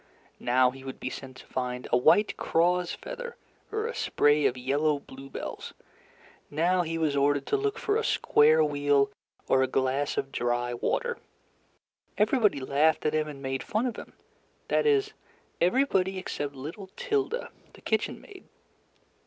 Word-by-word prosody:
Now 125 +1 +3
he 135 +1 -12
would 135 -1 -7
be 130 - -4
sent 130 -1 -8
to - - -13
find 125 -1 -4
a - - +8
white 160 +12 +4
craw's 175 +1 +1
feather - - -7 0.4
or 435 0 -1
a 475 - -3
spray 145 0 +3
of 125 - -2
yellow 145 +4 +1
bluebells; 135 -1 -8 0.7
now 175 +5 +2
he 165 -1 -3
was 155 -3 +1
ordered 140 0 +2
to - - +1
look 420 +1 -1
for 420 -2 0
a 455 - 0
square 155 - +4
wheel 145 -2 +2 0.4
or 130 - +4
a 130 - +3
glass 135 +2 0
of 135 - -2
dry 120 0 -1
water. 475 - -1 1.0
Everybody 210 - +3
laughed 145 +4 +2
at 155 - +2
him 155 0 +1
and 140 -2 -9
made 135 0 -2
fun 220 +2 -1
of 245 - -2
him - - -10 0.6
that - - +2
is, 430 0 +2 0.5
everybody 190 -2 +2
except 145 -6 -4
little 165 +9 -8
Tilda, 465 0 -1 0.2
the - - -16
kitchen - - -1
maid. 390 -2 -14
150 Hz, 160 wpm, -28 LUFS, 135-210 Hz, 1.0 s, a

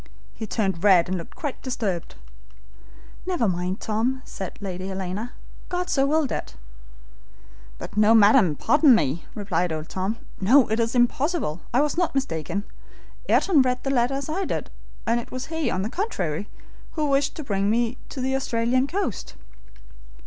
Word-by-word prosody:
He 220 - -6
turned 190 -5 -1
red 185 -4 +6
and 185 0 -2
looked 165 - -10
quite 290 -4 -5
disturbed. 205 -10 -3 1.1
"Never 350 -12 +1
mind, 180 +1 -1
Tom," 240 +5 -1
said 190 -2 -7
Lady 185 -2 -5
Helena. 195 +4 -4 0.4
"God 360 0 -2
so 270 -1 +3
willed 305 -1 +1
it." 65 - -4 1.2
"But, - - -8
no, 215 +2 +5
madam, 205 - +6
pardon 295 - +5
me," 155 -4 0
replied 180 -4 -1
old 155 0 -4
Tom. 190 +4 -2 0.2
"No, 245 +7 +5
it 220 - +1
is 230 +1 0
impossible, 245 - +1
I 250 - +3
was 300 +3 0
not 350 -5 0
mistaken. 200 - -2 0.7
Ayrton 330 -8 +4
read 250 -1 0
the 270 - -1
letter 250 0 +2
as 275 0 -3
I 345 +5 -1
did, - - -3 0.3
and 230 +2 +2
it 235 - -9
was 255 0 -4
he, 320 -2 0
on 185 - -1
the - - -1
contrary, 200 - -2 0.4
who 310 -2 0
wished 280 0 +1
to 310 - -6
bring 200 -5 0
me 235 +2 +1
to 265 - -5
the 265 +1 0
Australian 255 0 +1
coast." 355 - -3
230 Hz, 165 wpm, -24 LUFS, 190-275 Hz, 1.2 s, red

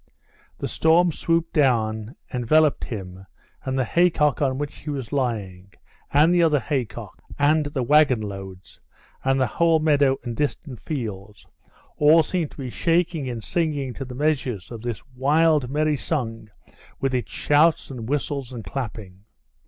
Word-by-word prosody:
The - - -3
storm 170 +2 +3
swooped 165 +1 -1
down, 115 -4 +1 0.2
enveloped 145 +5 +2
him 95 -3 -8 0.4
and 130 0 -2
the 130 - +1
haycock 160 -1 +2
on 130 -2 +1
which 145 0 -5
he 150 - -8
was 135 -3 -5
lying, 100 -8 -3 0.4
and 155 +5 +5
the 175 - +4
other 155 -3 +3
haycocks, 130 -6 -4
and 150 +1 +3
the 140 -3 -2
wagon 145 -2 +4
loads, 95 -3 -8 0.4
and 135 0 +2
the 130 - +3
whole 165 +7 +2
meadow 145 -3 +3
and 120 -2 -5
distant 140 -2 -3
fields 105 - -6 0.5
all 155 +2 +6
seemed 170 -4 -2
to - - -18
be 130 -4 -5
shaking 165 -4 0
and 115 -3 -5
singing 150 -6 -1
to 135 - -6
the 125 -1 -8
measures 130 - -1
of 115 -2 -7
this 120 -4 -5
wild 145 +2 +2
merry 150 +1 +1
song 115 -7 -3 0.5
with 135 -1 -1
its 125 -5 -2
shouts 150 +1 +2
and 120 -3 -7
whistles 140 -3 -2
and 120 -3 -7
clapping. 105 -5 -7
135 Hz, 155 wpm, -23 LUFS, 115-155 Hz, 0.5 s, all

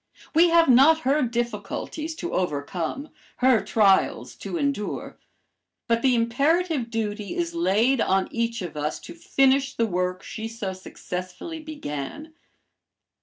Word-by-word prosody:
We 340 +2 +6
have 335 0 +5
not 275 +6 +6
her 285 +2 +2
difficulties 240 +6 -3
to 345 +1 -5
overcome, 175 - -2 0.3
her 255 -2 +4
trials 200 -4 +2
to - - -5
endure, 280 -9 -3 0.7
but 230 0 +2
the 255 -1 +3
imperative 275 +4 +1
duty 215 - -3
is 340 -1 -2
laid 255 - +2
on 190 0 +2
each 230 -2 -2
of 170 -3 -6
us 150 +1 -2
to 335 - -10
finish 270 -4 +2
the 230 - +2
work 180 -2 -2
she 220 0 -6
so 220 -4 -5
successfully 185 - -7
began. 300 - -6
235 Hz, 130 wpm, -25 LUFS, 195-300 Hz, 0.7 s, We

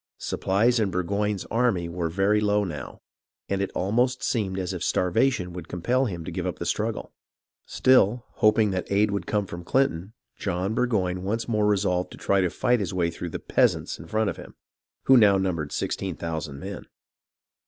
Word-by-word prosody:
Supplies 115 +6 +1
in 105 -3 +1
Burgoyne's 100 +2 -1
army 115 -8 +1
were 85 -1 -3
very 100 +4 +2
low 105 0 +2
now, 80 -6 -7 0.5
and 100 0 -1
it 100 - -1
almost 120 +6 +1
seemed 100 -6 -1
as 90 -2 -2
if - - -4
starvation 90 0 +1
would 90 -2 -7
compel 125 +10 0
him 85 -8 -5
to - - -5
give - - -3
up - - -3
the - - -5
struggle. - - -2 0.5
Still, 125 -2 +3
hoping 110 -1 +4
that 95 0 -3
aid 105 +1 +3
would 100 - -3
come 105 -1 0
from 85 -1 -8
Clinton, 100 -4 0 0.2
John 90 +4 -2
Burgoyne 95 -7 0
once 110 +5 -2
more 105 -3 +1
resolved 95 -3 +1
to - - -11
try 100 -1 +2
to 90 - +1
fight 120 +7 +1
his 95 -3 -3
way 85 -2 +1
through 85 +1 -6
the - - -4
"peasants" - - +1
in 80 - -10
front 110 +2 0
of - - -10
him, - - -11 0.5
who 130 - +6
now 100 -4 +6
numbered 85 -6 -2
sixteen 95 -3 -3
thousand 80 -3 -5
men. 100 +2 -7
100 Hz, 185 wpm, -25 LUFS, 90-110 Hz, 0.5 s, who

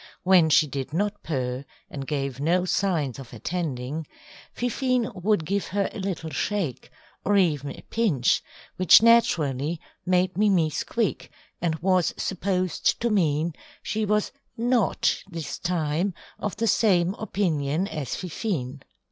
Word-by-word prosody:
When 180 -3 +5
she 155 - +5
did 140 0 -5
not 205 +4 -1
purr, 130 -4 -2 0.2
and 135 -2 -7
gave 140 -3 -2
no 175 +5 +2
signs 165 - 0
of 130 -3 -10
attending, 150 +1 -3 0.4
Fifine 250 0 0
would 190 -2 0
give 200 +4 -1
her 200 0 -1
a - - -6
little 185 -5 -3
shake, 190 - -2 0.3
or 205 +1 +3
even 150 -7 +2
a - - -9
pinch, 180 - +2 0.4
which 185 +4 +7
naturally 160 - +3 0.2
made 180 0 +1
Mimi 185 -7 +3
squeak, 215 +8 -2 0.3
and 165 -2 +1
was 185 -2 +2
supposed 185 -1 0
to 235 -1 +1
mean 165 -4 +1 0.3
she 220 +1 -1
was 210 0 +1 0.3
not 240 -2 +1
this 165 -4 -5
time 170 +1 -1 0.2
of 210 - -3
the 230 - -1
same 190 -4 +3
opinion 170 -5 0
as 150 - -4
Fifine. 155 - -3
180 Hz, 135 wpm, -25 LUFS, 150-200 Hz, 0.4 s, which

